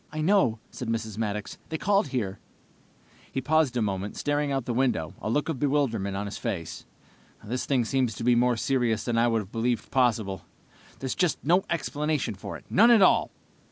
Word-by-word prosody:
"I 155 - -5
know," 165 - +3
said 125 - -6
Mrs. 110 -2 -3
Maddox. 105 -2 -3
"They 160 - -2
called 205 +3 +2
here." 100 -7 -3 0.9
He - - -2
paused 150 -2 +2
a 115 - +2
moment, 100 0 -3
staring 145 0 0
out 135 -3 -1
the 120 - -2
window, 115 -11 0
a - - -3
look 145 +5 0
of 160 -6 -3
bewilderment 125 -9 0
on 100 - -3
his 100 - -6
face. 95 -9 -5 0.6
"This 120 +4 -3
thing 130 -4 +2
seems 125 -2 0
to 115 - -6
be 120 +1 +4
more 120 0 +3
serious 120 -3 0
than 120 - -1
I 120 - +4
would 115 -2 +1
have 95 - -17
believed 120 +1 -1
possible. 110 -7 +1 0.6
There's 130 -1 -3
just 180 -4 +1
no 180 +6 +3
explanation 150 -6 -1
for 100 - -7
it, - - -19
none 230 +5 +5
at 230 -4 +7
all!" - - +4
125 Hz, 195 wpm, -27 LUFS, 110-145 Hz, 0.9 s, at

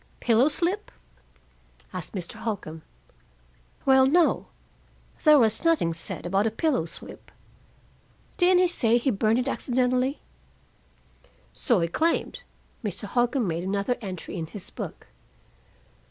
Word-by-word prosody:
"Pillow 235 +3 +4
slip?" 355 +7 0 1.0
asked - - -6
Mr. 180 -3 -5
Holcombe. 170 -8 -5 1.0
"Well, 265 -1 +6
no. 335 +4 +3 0.8
There 305 -1 +7
was 225 -4 +2
nothing 320 - +2
said 165 - -5
about 195 +4 +1
a - - +2
pillow 225 - 0
slip. 165 - -10 1.1
Didn't 360 0 +5
he - - +4
say 235 -9 +2
he 250 +2 +1
burned 220 +2 +2
it 250 +1 -1
accidentally?" 255 +1 0 1.3
"So 235 -9 +1
he 170 - +1
claimed." 325 - -1 0.4
Mr. 205 -2 -4
Holcombe 240 +2 0
made 170 0 -2
another 200 +5 -1
entry 190 -2 -6
in 160 -2 -4
his 195 +3 -9
book. - - -7
235 Hz, 125 wpm, -26 LUFS, 195-275 Hz, 1.3 s, There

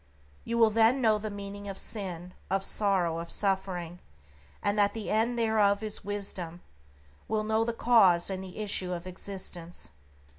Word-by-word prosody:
You 235 - -2
will 225 -2 +6
then 225 +4 +4
know 220 -4 +3
the 215 +1 -4
meaning 200 0 -7
of 195 - -6
Sin, 180 -4 -4 0.2
of 195 0 +1
Sorrow, 190 -6 +1
of 170 0 -6
Suffering, 185 -3 -1 0.6
and 205 - +2
that 205 0 +3
the 220 -2 -4
end 230 +3 +2
thereof 220 -2 +3
is 215 -1 -3
Wisdom; 190 -4 -3 0.6
will 215 0 0
know 220 +1 +2
the 235 - 0
cause 220 -7 +4
and 190 0 -4
the 185 -1 -10
issue 200 -4 -1
of 175 0 -5
existence. 180 - -6
200 Hz, 160 wpm, -29 LUFS, 180-220 Hz, 0.6 s, will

